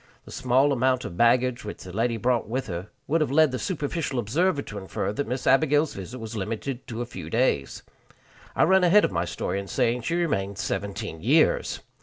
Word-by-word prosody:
The - - -12
small 130 +3 +2
amount 130 0 +1
of 85 - -6
baggage 120 +3 +3
which 105 - -7
the 90 - -9
lady 115 +1 0
brought 120 0 0
with 130 +3 -2
her 90 +1 -6 0.2
would 160 +3 +1
have 155 - +1
led 155 +1 +4
the 130 - -3
superficial 150 -5 -2
observer 140 - +1
to 105 - -7
infer 95 +1 -3
that 140 +4 -3
Miss 125 +2 -3
Abigail's 145 +3 +3
visit 95 +6 -7
was 115 -1 -7
limited 115 +5 -4
to 120 0 -4
a - - -6
few 90 -9 -8
days. 110 - 0 0.7
I - - +4
run 190 +2 +4
ahead 190 +4 +6
of - - -2
my 85 -1 -1
story 95 - -3
in 100 - -7
saying 120 +2 0
she 165 +9 -2
remained 100 - -1
seventeen 100 -5 -4
years! 150 +9 +2
120 Hz, 205 wpm, -25 LUFS, 105-140 Hz, 0.7 s, ahead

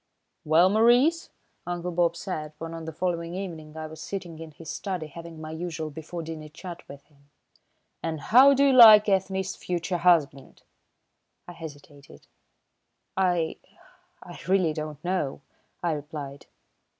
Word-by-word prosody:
"Well, 160 +4 +5
Maurice," 240 - +3 0.4
Uncle 175 0 -3
Bob 170 -1 +1
said, 155 -4 -5
when 165 +1 -7
on 165 -1 -7
the 160 - -5
following 170 +1 -3
evening 160 -5 -7
I 155 - -5
was 155 0 -10
sitting 175 -5 -6
in 165 -1 -8
his 155 +2 -14
study 185 -1 -4
having 165 +1 -10
my 155 0 -7
usual 160 -1 -5
before 160 +3 -7
dinner 155 -1 -8
chat 175 +2 -9
with 140 0 -11
him, 140 -2 -29 0.7
"and 160 -1 -3
how 265 - +6
do 280 +1 +4
you 275 - +4
like 220 -4 +9
Ethne's 190 -1 0
future 175 0 -3
husband?" 155 -6 +1 0.8
I - - -8
hesitated. 145 -4 -12 0.9
"I 175 -4 +1 0.7
I - - -11
really 185 -4 +2
don't 155 0 -7
know," 180 -7 -2 0.4
I 170 - +1
replied. 145 -2 -7
165 Hz, 145 wpm, -26 LUFS, 155-185 Hz, 0.9 s, like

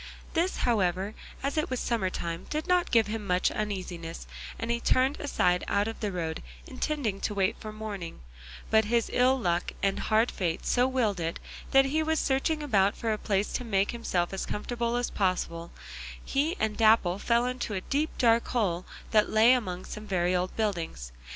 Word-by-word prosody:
This, 350 +3 +1
however, 195 -3 +1 0.3
as 280 +3 -1
it 305 - -1
was 255 -1 -2
summer 225 -6 0
time, 170 -2 -5
did 305 +1 -2
not 360 -1 +2
give 230 -2 +4
him 210 -1 -4
much 180 0 +2
uneasiness, 180 -5 -4 0.3
and 230 +1 -3
he 235 - 0
turned 260 +4 +2
aside 180 -11 +1
out 200 +1 +1
of 225 - -5
the 210 -3 -2
road 165 -3 -3 0.2
intending 255 -7 -2
to 210 - -2
wait 195 +1 +1
for 215 - -7
morning; 205 - -6 0.5
but 220 0 +5
his 230 +1 +1
ill 255 +2 +4
luck 175 -7 -1
and 195 0 +1
hard 220 +2 +2
fate 170 -4 -2
so 250 +1 +3
willed 235 -7 0
it 165 0 -2 0.3
that 270 0 +6
as 270 - -2
he 315 +2 +2
was 315 0 +1
searching 300 +3 0
about 205 -7 +2
for 225 -1 0
a - - -2
place 200 0 0
to 250 - -2
make 200 -4 +1
himself 190 -7 -1
as 195 - -3
comfortable 235 +2 -2
as 245 0 -1
possible, 170 -3 -1 0.5
he 300 +6 0
and 215 -1 0
Dapple 215 -5 +4
fell 235 +2 +2
into 250 -4 -3
a 185 - -2
deep 295 +9 0
dark 230 -1 +3
hole 185 -7 -1 0.2
that 215 -1 +4
lay 225 +3 +6
among 185 -7 -2
some 215 0 -8
very 180 -1 +1
old 180 +1 -1
buildings. 170 - -2
215 Hz, 190 wpm, -28 LUFS, 185-245 Hz, 0.5 s, that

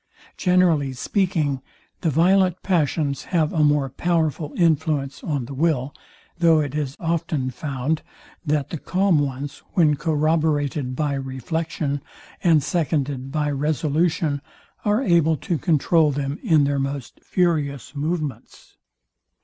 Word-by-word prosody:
Generally 175 -7 +2
speaking, 155 - 0 0.4
the 165 - 0
violent 180 +4 +3
passions 155 -5 0
have 160 -4 0
a 155 - +2
more 145 -2 +3
powerful 160 0 -1
influence 150 -5 +1
on 145 -6 -2
the 140 - -8
will; 140 -2 0 0.5
though 165 -2 +5
it 145 -3 -2
is 145 -2 -3
often 160 -5 -1
found, 140 +3 -2 0.4
that 150 -3 -1
the 165 - -4
calm 185 -1 +2
ones, 140 0 -3
when 155 -5 +4
corroborated 150 -3 0
by 145 +1 0
reflection, 140 +2 -3 0.4
and 160 -5 +4
seconded 140 -5 -1
by 150 -1 0
resolution, 155 +1 0 0.4
are 210 +5 +2
able 165 - +3
to 170 -1 -2
controul 160 -1 +3
them 140 +1 -3
in 155 -3 +4
their 140 0 +1
most 135 -1 -4
furious 150 -6 0
movements. 150 -1 -4
150 Hz, 125 wpm, -23 LUFS, 140-165 Hz, 0.5 s, though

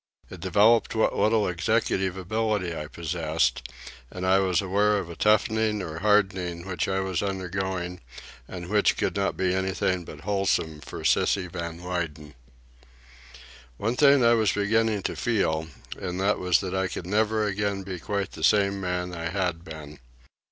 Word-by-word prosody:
It 95 - -9
developed 105 +6 +3
what 110 - +2
little 110 -1 +2
executive 95 0 0
ability 105 -2 -1
I 75 - -5
possessed, 80 0 -1 0.5
and 90 0 -5
I 95 +1 +4
was 95 -3 +2
aware 100 +2 +2
of 90 -4 -4
a - - -8
toughening 110 0 +2
or 80 -1 -6
hardening 95 -4 +1
which 95 -1 -2
I 95 0 0
was 95 -2 -1
undergoing 95 -2 -3 0.5
and 90 -2 -7
which 105 +2 +2
could - - -1
not 100 -1 -1
be 90 -1 +1
anything 95 -1 0
but 75 -3 -11
wholesome 90 -5 0
for 75 - -8
"Sissy" 95 -2 +2
Van 85 -1 -6
Weyden. 80 -5 -4 1.4
One 115 - -1
thing 140 -2 +5
I 115 - +6
was 110 -4 +2
beginning 105 0 +1
to - - -2
feel, 80 -9 0 0.3
and 90 -1 -5
that 100 +2 +1
was 90 -1 +2
that 95 -2 -4
I 95 0 0
could 90 - -6
never 110 +2 +1
again 100 -1 -1
be 95 -2 -6
quite 100 +1 -3
the - - -8
same 100 -1 +3
man 90 -1 -2
I 85 -1 -4
had 90 -3 -2
been. 75 -3 -10
95 Hz, 165 wpm, -26 LUFS, 85-105 Hz, 1.4 s, I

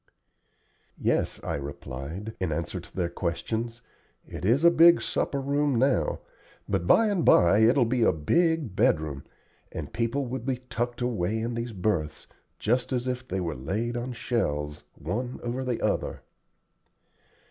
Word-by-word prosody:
"Yes," - - 0
I - - -2
replied, 70 +8 -6
in 95 - -1
answer 85 +2 -3
to 85 0 -14
their 90 -2 0
questions; 115 +8 -3 0.4
"it - - -8
is 120 - +3
a 170 - +8
big 170 +1 +7
supper 140 - -1
room 140 0 +1
now, 125 - +1 0.5
but 85 - -1
by 225 - +6
and 200 -6 +1
by 90 +4 +6
it 115 +4 +5
will 125 - +5
be 120 +1 0
a 115 - +5
big 155 - +1
bedroom, 75 -7 +1 0.5
and 70 - -6
people 120 +4 0
will 130 +2 -3
be 130 +2 -2
tucked 120 +1 -2
away 110 -4 0
in 115 +2 -2
these 115 0 -3
berths, 90 -7 -2 0.3
just 120 +4 0
as 125 -1 -1
if 125 0 -3
they 95 - -2
were 85 -3 -2
laid 105 - -3
on 120 +1 -3
shelves, 75 - -2
one 120 - -4
over 120 +2 -2
the 125 -3 -2
other." - - -1
115 Hz, 160 wpm, -27 LUFS, 85-125 Hz, 0.5 s, a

